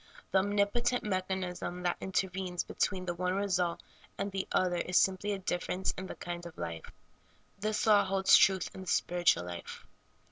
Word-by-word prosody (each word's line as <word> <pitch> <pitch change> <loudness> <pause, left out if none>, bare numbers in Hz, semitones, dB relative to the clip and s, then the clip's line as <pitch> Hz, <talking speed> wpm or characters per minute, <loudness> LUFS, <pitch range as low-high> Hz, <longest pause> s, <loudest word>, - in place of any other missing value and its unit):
The 190 - +5
onjnipotent 205 +5 +1
mechanism 185 -2 -3
that 175 - 0
inter\^enes 185 -1 -2
between 185 -2 -1
the 175 - -1
one 180 +1 -1
result 185 -4 0 0.3
and 200 0 -2
the 190 0 -3
other 180 -1 +2
is 180 +1 +1
simply 190 +2 +2
a 200 - -1
difference 185 0 -2
in 190 0 -6
the - - -7
kind 175 0 -6
of 170 - -13
life. 80 0 -6 0.7
This 215 +1 -1
law 210 -2 +6
holds 190 0 +4
true 190 -1 +6 0.2
in 190 - -8
the 185 - -10
spiritual 175 - +2
life. 85 -1 -8
185 Hz, 170 wpm, -31 LUFS, 180-195 Hz, 0.7 s, law